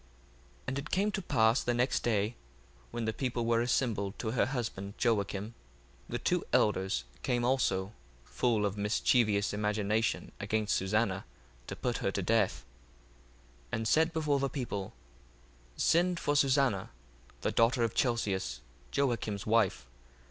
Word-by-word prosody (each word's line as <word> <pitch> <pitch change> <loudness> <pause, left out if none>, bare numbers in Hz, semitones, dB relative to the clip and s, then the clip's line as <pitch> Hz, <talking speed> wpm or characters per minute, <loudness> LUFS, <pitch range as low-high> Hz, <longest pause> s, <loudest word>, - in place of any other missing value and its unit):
1:28 - - -29 0.6
And 130 +1 -2
it 145 - -7
came 200 +3 +1
to 195 - -2
pass 115 -7 +3
the 120 - 0
next 125 +2 +1
day, 110 -1 +1 0.6
when 120 -1 -3
the 110 - -1
people 120 -2 -2
were 115 0 +3
assembled 115 -5 0
to 110 - -3
her 125 - +2
husband 110 -6 -4
Joacim, 105 -2 0 0.6
the - - -2
two - - 0
elders 95 - +2 0.2
came 120 -1 0
also 105 -6 +1 0.3
full 115 -4 +1
of 100 0 -2
mischievous 105 0 +2
imagination 105 +1 0
against 110 -1 0
Susanna 95 0 0 0.4
to - - -5
put - - -2
her - - -1
to - - -1
death; - - +1 1.1
1:29 - - -21
And 115 -1 -1
said 160 +6 +3
before 150 -4 +1
the 135 0 0
people, 110 -8 -4 0.8
Send 175 +1 +3
for 145 - 0
Susanna, 135 -8 +2 0.5
the - - 0
daughter 115 +1 +3
of 115 -1 0
Chelcias, 100 - 0 0.3
Joacim's 115 -7 -1
wife. 105 - +2
115 Hz, 145 wpm, -31 LUFS, 100-130 Hz, 1.1 s, pass